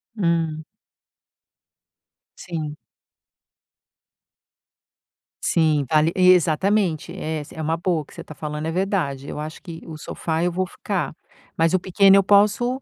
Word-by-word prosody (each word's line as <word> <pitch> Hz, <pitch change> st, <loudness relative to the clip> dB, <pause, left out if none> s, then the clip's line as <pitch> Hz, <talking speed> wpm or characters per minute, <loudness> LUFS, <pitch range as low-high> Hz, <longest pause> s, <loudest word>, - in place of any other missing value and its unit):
Hum. 165 Hz, -5 st, 0 dB, 1.7 s
Sim. 155 Hz, -4 st, -5 dB, 2.7 s
Sim, 155 Hz, -4 st, +2 dB
vale 155 Hz, +1 st, +3 dB
exatamente. 185 Hz, 0 st, +3 dB
É 160 Hz, 0 st, -3 dB
essa 145 Hz, -, -10 dB
é 160 Hz, -, -5 dB
uma 160 Hz, +2 st, 0 dB
boa, 170 Hz, -1 st, 0 dB
o 150 Hz, -, -12 dB
que -, -, -18 dB
você -, -, -9 dB
tá -, -, -11 dB
falando 150 Hz, 0 st, -5 dB
é 160 Hz, -, -1 dB
verdade. 165 Hz, -7 st, -1 dB
Eu -, -, -6 dB
acho 155 Hz, +1 st, -7 dB
que 165 Hz, -4 st, -9 dB
o 160 Hz, -2 st, -8 dB
sofá, 160 Hz, +2 st, -3 dB
eu 180 Hz, -, +1 dB
vou 185 Hz, +2 st, -1 dB
ficar, 185 Hz, -2 st, -3 dB, 0.4 s
mas 165 Hz, +2 st, +2 dB
o 185 Hz, -, +3 dB
pequeno 195 Hz, +2 st, +5 dB
eu 195 Hz, -, +4 dB
posso, 210 Hz, +6 st, +3 dB
165 Hz, 140 wpm, -22 LUFS, 155-185 Hz, 2.7 s, pequeno